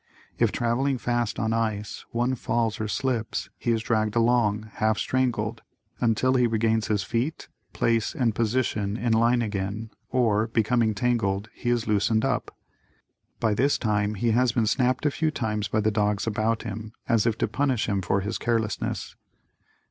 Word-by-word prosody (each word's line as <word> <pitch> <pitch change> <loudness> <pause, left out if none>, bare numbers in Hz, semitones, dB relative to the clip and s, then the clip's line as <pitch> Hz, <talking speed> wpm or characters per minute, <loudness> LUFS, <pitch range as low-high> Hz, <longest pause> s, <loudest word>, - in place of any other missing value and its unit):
If - - +3
traveling 130 +3 0
fast 120 -2 -1
on 110 -1 0
ice 110 -2 -2
and - - -42
one 120 +2 +1
falls 115 -2 -1
or 110 - -1
slips, 120 -1 -2
he - - -2
is 115 -1 +1
dragged 110 -1 0
along, 115 -3 +2
half 110 -1 +2
strangled, 115 -4 -1 0.4
until 120 +2 +2
he 125 -2 +3
regains 110 -1 +1
his 105 -3 0
feet, 120 +9 -2 0.2
place 115 +4 0
and 120 -7 +1
position 110 -3 0
in 120 -1 0
line 120 +2 +3
again, 105 +1 -3 0.2
or, 115 -4 +2
becoming 115 -1 +1
tangled 105 -2 0
he 120 - -3
is 120 -1 +1
loosened 105 +1 +2
up. - - -1 0.9
By 110 -2 +2
this 140 +7 +2
time 105 -1 0
he 115 +3 +1
has 120 +1 +3
been 115 -3 +2
snapped 130 +5 +1
a 150 - +3
few 160 +3 0
times 105 -8 -2
by 110 - 0
the 110 +1 +2
dogs 105 -1 0
about 110 +1 0
him 110 0 -6
as 115 -1 +3
if 115 -1 +1
to - - +1
punish 135 -5 0
him 100 -2 0
for 95 +2 0
his 105 +3 -3
carelessness. 115 -3 -2
115 Hz, 170 wpm, -26 LUFS, 105-120 Hz, 0.9 s, If